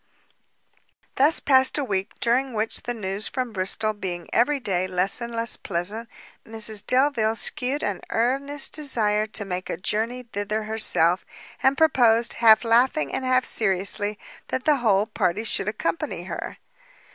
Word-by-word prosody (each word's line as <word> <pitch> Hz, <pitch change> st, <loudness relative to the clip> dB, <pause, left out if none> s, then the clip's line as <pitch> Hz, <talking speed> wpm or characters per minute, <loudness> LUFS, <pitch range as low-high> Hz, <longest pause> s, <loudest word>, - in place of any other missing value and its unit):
Thus 290 Hz, +4 st, +5 dB
passed 265 Hz, 0 st, +3 dB
a 290 Hz, -, -1 dB
week, 195 Hz, -5 st, -3 dB
during 250 Hz, +2 st, 0 dB
which 215 Hz, +1 st, -2 dB
the 245 Hz, -, -4 dB
news 200 Hz, -1 st, -3 dB
from 250 Hz, -3 st, -4 dB
Bristol 200 Hz, +3 st, -1 dB
being 180 Hz, -4 st, -6 dB
every 280 Hz, +5 st, +2 dB
day 185 Hz, -6 st, -2 dB
less 185 Hz, +4 st, 0 dB
and 235 Hz, 0 st, -5 dB
less 230 Hz, 0 st, +1 dB
pleasant, 205 Hz, +5 st, -4 dB, 0.3 s
Mrs 220 Hz, -2 st, 0 dB
Delvile 250 Hz, -4 st, +1 dB
shewed 260 Hz, +5 st, -2 dB
an 200 Hz, -3 st, -3 dB
earnest 275 Hz, +5 st, 0 dB
desire 215 Hz, -8 st, +1 dB
to 215 Hz, -1 st, -4 dB
make 185 Hz, -1 st, -5 dB
a -, -, -3 dB
journey 225 Hz, +6 st, -2 dB
thither 215 Hz, -1 st, -4 dB
herself, 210 Hz, -5 st, +2 dB, 0.4 s
and 265 Hz, +1 st, +2 dB
proposed, 240 Hz, -7 st, +3 dB
half 220 Hz, 0 st, +6 dB
laughing 230 Hz, -, +2 dB
and 265 Hz, -, -2 dB
half 255 Hz, 0 st, +2 dB
seriously, 205 Hz, +1 st, +1 dB, 0.3 s
that 260 Hz, -, -4 dB
the 300 Hz, -2 st, +3 dB
whole 210 Hz, -5 st, +2 dB
party 210 Hz, -2 st, -1 dB
should 200 Hz, -3 st, -1 dB
accompany 170 Hz, -4 st, -3 dB
her. 185 Hz, -, -7 dB
220 Hz, 150 wpm, -23 LUFS, 200-250 Hz, 0.4 s, half